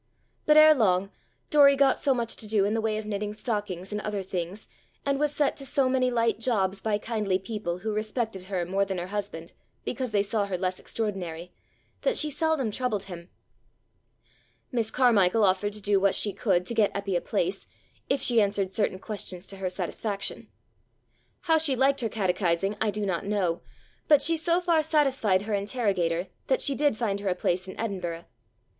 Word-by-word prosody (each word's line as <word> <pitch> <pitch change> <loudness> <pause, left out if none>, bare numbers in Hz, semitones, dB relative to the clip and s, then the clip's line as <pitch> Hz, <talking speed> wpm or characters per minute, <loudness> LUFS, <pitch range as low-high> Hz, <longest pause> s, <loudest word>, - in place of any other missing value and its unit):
But 300 0 +6
ere 310 0 +9
long 195 -6 +1 0.4
Doory 280 -2 +6
got 275 0 +3
so 275 -2 +2
much 235 -2 -2
to 215 - -8
do 210 -2 +2
in 205 - 0
the 225 - 0
way 220 -1 0
of 215 - -5
knitting 210 0 -3
stockings 205 -5 -3
and 210 0 -3
other 210 -2 -3
things, 185 +1 -5 0.4
and 275 -1 0
was 295 -1 +1
set 290 -1 +1
to 275 - -6
so 270 -1 +2
many 255 -1 +2
light 230 -2 +1
jobs 200 -5 0
by 215 -2 0
kindly 210 -4 -1
people 195 -3 -4
who 215 +4 -3
respected 215 -2 -3
her 185 -2 -2
more 195 +3 +1
than 195 -1 -3
her 175 - -3
husband 195 -5 -5 0.3
because 260 -2 -3
they 205 -1 +2
saw 205 0 0
her 190 -2 -2
less 185 0 -2
extraordinary, 180 -6 -4 0.5
that - - +1
she 300 -1 +2
seldom 305 -6 0
troubled 215 -4 -1
him. 175 -3 -10 1.4
Miss 230 -3 -1
Carmichael 225 -5 +3
offered 200 +2 +2
to 210 - -6
do 200 0 +2
what 195 0 +3
she 205 0 +1
could 180 -5 +1
to 235 - -1
get 220 -3 +3
Eppy 200 -2 -2
a 175 - +1
place, - - -2 0.4
if 275 - +1
she 235 -3 +4
answered 200 -2 0
certain 205 -3 0
questions 190 -3 -6
to 195 - -8
her 190 -1 -2
satisfaction. 195 +2 -3 0.9
How 320 -2 +3
she 300 -4 +1
liked 270 +2 +2
her 225 - -1
catechizing 190 -1 0
I 220 - +2
do 210 0 -2
not 180 -4 -1
know, 195 -4 -1 0.5
but 295 -2 +6
she 330 - +3
so 335 +2 +1
far 340 -3 +3
satisfied 270 -11 +2
her 215 0 -3
interrogator 195 -5 0 0.2
that 260 - +2
she 280 - +3
did 290 -4 +1
find 205 -4 -1
her 200 -1 -2
a 180 - 0
place 180 +1 -1
in 190 - -9
Edinburgh. 180 -6 -4
210 Hz, 195 wpm, -27 LUFS, 190-250 Hz, 1.4 s, ere